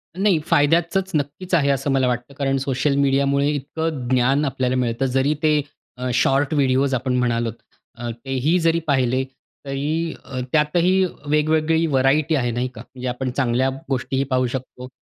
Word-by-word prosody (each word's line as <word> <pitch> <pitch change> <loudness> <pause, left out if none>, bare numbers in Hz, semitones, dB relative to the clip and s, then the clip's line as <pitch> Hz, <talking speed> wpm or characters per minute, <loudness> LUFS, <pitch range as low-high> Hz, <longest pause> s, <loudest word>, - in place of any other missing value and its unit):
नाही 190 -3 +2
फायद्याचचं 165 +6 +3 0.2
नक्कीच 150 +6 -5
आहे 140 -4 +2
असं 140 +1 0
मला 130 -1 +2
वाटतं. 125 +2 -3
कारण 135 -1 0
सोशल 135 +1 0
मीडियामुळे 140 +1 +2
इतकं 150 -1 -3
ज्ञान 130 +3 +2
आपल्याला 130 -1 -1
मिळतं 125 +1 0
जरी 135 +3 +1
ते 150 -1 +3 0.4
अ, 125 0 -2
शॉर्ट 135 +3 +2
व्हिडिओस 135 -1 +2
आपण 130 0 0
म्हणालोत 120 -2 0 0.4
अ, 120 0 -5
ते 125 +4 -9
ही 155 +8 +2
जरी 165 0 +2
पाहिले 130 -2 +2 0.4
तरी 150 +4 -2 0.4
त्यातही 175 +5 +3 0.2
वेगवेगळी 155 +2 +2
व्हेरायटी 140 +2 +2
आहे 120 -3 0
नाही 120 +2 -1
का? 110 - -8
म्हणजे 125 0 -8
आपण 125 +1 -2
चांगल्या 130 0 +1 0.2
गोष्टीही 135 +1 -1
पाहू 130 -1 0
शकतो. 125 0 -6
135 Hz, 155 wpm, -21 LUFS, 130-150 Hz, 0.4 s, फायद्याचचं